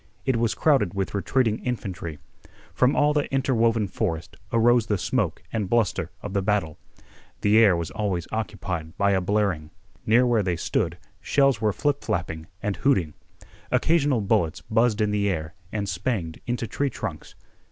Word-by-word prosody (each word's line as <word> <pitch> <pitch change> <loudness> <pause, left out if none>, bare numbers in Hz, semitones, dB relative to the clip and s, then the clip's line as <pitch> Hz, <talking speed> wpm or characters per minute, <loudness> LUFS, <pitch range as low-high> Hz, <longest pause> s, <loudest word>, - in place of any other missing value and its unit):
It 130 -3 +2
was 115 -1 +1
crowded 135 - +2
with 95 -1 -2
retreating 110 +2 +1
infantry. 95 -10 -4 0.6
From 130 +2 +3
all 150 0 +3
the 145 -1 -1
interwoven 115 -5 +2
forest 85 -5 -3 0.2
arose 115 0 +4
the 105 - +1
smoke - - -1
and 105 -4 -1
bluster 115 -4 +1
of 105 - -5
the 100 - +1
battle. 95 -6 -1 0.6
The 105 +2 +5
air 100 -6 +6
was 85 0 -4
always 95 -6 -2
occupied 90 -6 -4
by 100 0 +3
a 95 -1 +2
blaring. 95 -5 0 0.4
Near 120 +4 +5
where 120 -3 +3
they 90 -3 0
stood 80 - -1 0.2
shells 135 -5 +2
were 110 -1 +2
flip 145 +7 -1
flapping 80 -2 -3 0.2
and 100 -3 -1
hooting. 90 - +2 0.6
Occasional 145 -7 +2
bullets 85 -4 +1
buzzed 110 +4 +1
in 105 -1 +2
the 100 -1 +1
air 80 -3 -3 0.2
and 105 -2 -2
spanged 90 -3 -2
into 120 -1 -1
tree 140 +5 -1
trunks. 105 -9 -6
105 Hz, 165 wpm, -25 LUFS, 90-120 Hz, 0.6 s, air